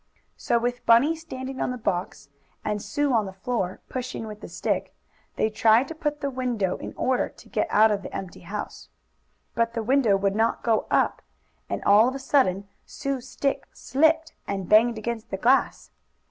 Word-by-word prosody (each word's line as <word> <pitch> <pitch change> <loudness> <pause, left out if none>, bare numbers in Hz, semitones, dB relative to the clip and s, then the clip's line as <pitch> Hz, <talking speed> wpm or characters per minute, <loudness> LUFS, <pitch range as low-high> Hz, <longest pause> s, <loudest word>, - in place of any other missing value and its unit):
So 235 - 0
with 245 +1 -2
Bunny 260 +8 +5
standing 265 -5 -7
on - - 0
the 250 - -3
box, 185 -9 -3 0.4
and 210 -1 -1
Sue, 275 +7 0
on 220 -4 +2
the - - -6
floor, 190 -2 -3
pushing 250 -3 -5
with 210 -1 -9
the - - -8
stick, - - -2 0.4
they 220 - +1
tried 225 +4 +4
to - - -4
put 300 -2 -1
up 295 - -24
the 280 -1 -1
window 240 -8 -1
in - - -8
order 255 -1 +1
to - - -18
get - - 0
out 220 +1 +5
of 205 -1 0
the - - -8
empty 190 -2 -6
house. - - -7 0.6
But 230 0 0
the 230 - -1
window 240 -4 +3
would 195 0 0
not 225 +1 +1
go 225 -2 +1
up, - - +1 0.5
and - - -3
all 210 +3 +6
of 260 - -2
a - - -4
sudden 205 -9 +1 0.2
Sue's 265 -2 -5
stick 275 -1 -2
slipped 320 +3 +1
and 195 -2 -3
banged 225 +2 +5
against 225 0 -4
the 195 - -3
glass. 255 +7 +2
235 Hz, 190 wpm, -25 LUFS, 210-265 Hz, 0.6 s, all